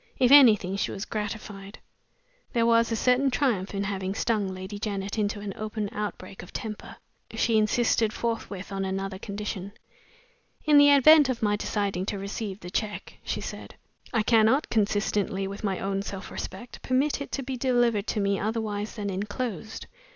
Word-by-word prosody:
If 255 -1 +4
anything, 215 -9 +7
she - - -1
was 195 - -5
gratified 210 -1 -6 0.8
there 230 -1 +2
was 230 0 +4
a - - +1
certain 250 +4 +3
triumph 235 -8 0
in 200 - -1
having 195 -1 -3
stung 215 -3 0
Lady 190 +2 -6
Janet 200 0 -3
into 205 0 -1
an 200 -1 -5
open 215 -1 -4
outbreak 200 -2 -5
of 175 - -12
temper. 215 -2 -6 0.4
She 230 - +2
insisted 220 0 +2
forthwith 215 -5 -4
on 195 0 -2
another 190 0 -3
condition. 200 -1 -5 0.9
"In 300 -2 +7
the 285 0 +7
event 285 +1 +7
of 240 -3 -2
my 205 -1 +3
deciding 200 -3 -2
to 205 - -2
receive 200 0 -5
the 180 - -8
check," 210 +1 -4
she - - -3
said, - - -8 0.4
"I 225 -3 +1
cannot, 225 +6 +3
consistently 205 -2 0
with 200 +3 -7
my 195 -3 0
own 195 +1 -2
self 195 -1 -7
respect, 240 - -7
permit 275 +3 +1
it 280 - -6
to 275 - -2
be 265 +1 -4
delivered 240 -4 +1
to 215 - -1
me 200 -1 +1
otherwise 215 -1 -3
than 205 -3 -3
inclosed. 210 +2 -4
210 Hz, 170 wpm, -27 LUFS, 195-230 Hz, 0.9 s, anything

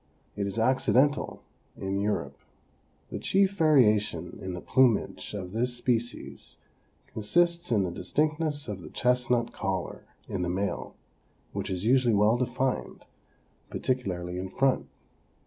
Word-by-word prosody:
It 100 -1 -1
is 100 - -4
accidental 130 +4 +2 0.3
in 95 0 -2
Europe. 70 -9 -2 0.7
The - - -4
chief 195 0 +3
variation 130 - +3
in 95 -1 -4
the - - -5
plumage 120 -2 +2
of 90 -3 -5
this 120 +3 0
species 120 -1 -3 0.6
consists 170 +10 +1
in 105 -4 +3
the 90 - -2
distinctness 150 - -1
of 100 -4 -5
the - - -9
chestnut 125 -1 +1
collar 95 -2 -3 0.2
in 95 - -3
the 90 - -1
male, 100 +3 -2 0.6
which - - -3
is 95 +1 -3
usually 120 -2 +4
well 105 +3 +4
defined, 125 +1 -2 0.6
particularly 90 -8 -2
in 95 +1 -4
front. 135 +6 +1
115 Hz, 130 wpm, -28 LUFS, 95-130 Hz, 0.7 s, usually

